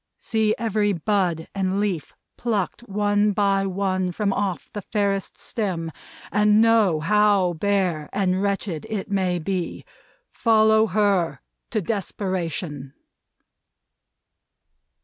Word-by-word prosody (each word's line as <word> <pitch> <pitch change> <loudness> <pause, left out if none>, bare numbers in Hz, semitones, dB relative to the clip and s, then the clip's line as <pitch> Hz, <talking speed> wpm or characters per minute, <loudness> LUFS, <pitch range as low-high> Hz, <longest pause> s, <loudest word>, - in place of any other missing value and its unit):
See 220 -2 +1
every 215 -2 +1
bud 175 -2 0
and 195 0 0
leaf 190 -7 -2 0.2
plucked 220 -3 -2
one 205 +1 +2
by 195 -1 +2
one 185 -1 -1
from 200 +1 0
off 195 -3 -2
the 205 - -4
fairest 200 -2 -1
stem, 180 -7 -3 0.4
and 210 +2 +4
know 220 -7 +4
how 205 0 +3
bare 180 -4 0
and 190 -1 0
wretched 195 -5 -2
it 205 -2 -4
may 185 -3 +1
be. 175 +1 -3 0.5
Follow 220 -1 +4
her! 200 -4 +1 0.3
To 215 -4 -1
desperation!" 175 - -3
200 Hz, 110 wpm, -23 LUFS, 180-210 Hz, 0.5 s, and